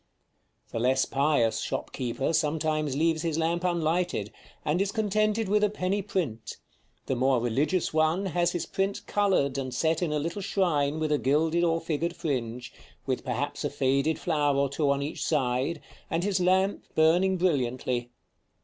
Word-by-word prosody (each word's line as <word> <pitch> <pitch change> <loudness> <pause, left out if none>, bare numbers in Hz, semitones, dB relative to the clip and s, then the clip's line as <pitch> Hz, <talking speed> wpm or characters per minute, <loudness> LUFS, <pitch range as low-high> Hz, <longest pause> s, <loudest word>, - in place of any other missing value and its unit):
The 115 - -3
less 130 +3 +2
pious 135 -6 +1
shop - - -3
keeper 130 +4 -2
sometimes 155 -2 0
leaves 160 0 +2
his 165 -2 -1
lamp 170 +2 0
unlighted, 170 - 0 0.3
and 155 +5 +1
is 200 0 0
contented 215 0 +1
with 210 +2 +2
a 210 - +4
penny 195 0 -1
print; 165 - -3 0.5
the 130 - -1
more 130 0 +2
religious 140 +11 0
one 160 +5 +2
has 175 -1 +1
his 175 -2 -2
print 195 +1 -2
colored 185 -10 +1
and 130 -1 -4
set 160 +4 0
in 170 -4 0
a 150 - 0
little 170 +7 -3
shrine 160 -7 0
with 155 -1 -1
a 150 - +2
gilded 160 +5 +2
or 165 -1 +2
figured 165 +1 -2
fringe, 125 -6 -3 0.3
with - - -2
perhaps - - -3
a - - 0
faded 140 +4 +1
flower 145 -4 +1
or 140 0 +2
two 140 +1 0
on 140 0 +1
each 145 +1 -4
side, 140 +1 0 0.3
and 165 +2 -1
his 195 -1 +1
lamp 190 +2 +2
burning 175 +4 +4
brilliantly. 130 -7 0
160 Hz, 165 wpm, -27 LUFS, 140-180 Hz, 0.5 s, a